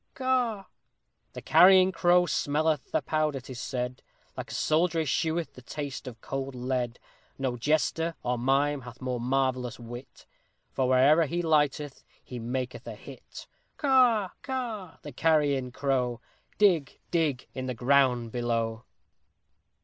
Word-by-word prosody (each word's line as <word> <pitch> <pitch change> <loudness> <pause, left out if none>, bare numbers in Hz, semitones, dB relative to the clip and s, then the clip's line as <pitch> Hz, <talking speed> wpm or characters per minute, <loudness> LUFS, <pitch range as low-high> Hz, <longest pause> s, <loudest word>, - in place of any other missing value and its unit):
Caw!_ 250 -6 0 0.7
The - - -8
Carrion 185 0 +6
Crow 175 0 +4
smelleth 155 -2 0 0.2
powder, 155 -3 0
'tis 130 0 -9
said, 125 -1 -4 0.3
Like - - -6
a - - -7
soldier 165 +1 +1
escheweth 160 +2 -1
the 125 - -13
taste 140 +1 -6
of 115 -3 -8
cold 135 -1 -4
lead; 125 -1 -2 0.4
No 130 -2 -2
jester, 155 +5 0
or 125 -1 -1
mime, 135 +3 +1
hath 125 0 -11
more 125 -2 -3
marvellous 130 -1 -1
wit, 120 +2 -10 0.5
For, 130 - 0
wherever 145 +5 +5
he 175 +4 -2
lighteth, 150 -3 0 0.2
he 125 - -8
maketh 125 +2 -4
a - - -6
hit! - - -12 0.3
Caw! 250 -8 +3
Caw! 235 -9 -5
the - - -7
Carrion 145 -5 +1
Crow! 125 -3 -1 0.4
_Dig! 175 -10 +3
Dig! 155 -7 0
in 130 0 -5
the 125 - -3
ground 125 -2 +2
below! 115 -2 -2
135 Hz, 135 wpm, -28 LUFS, 125-165 Hz, 0.7 s, Carrion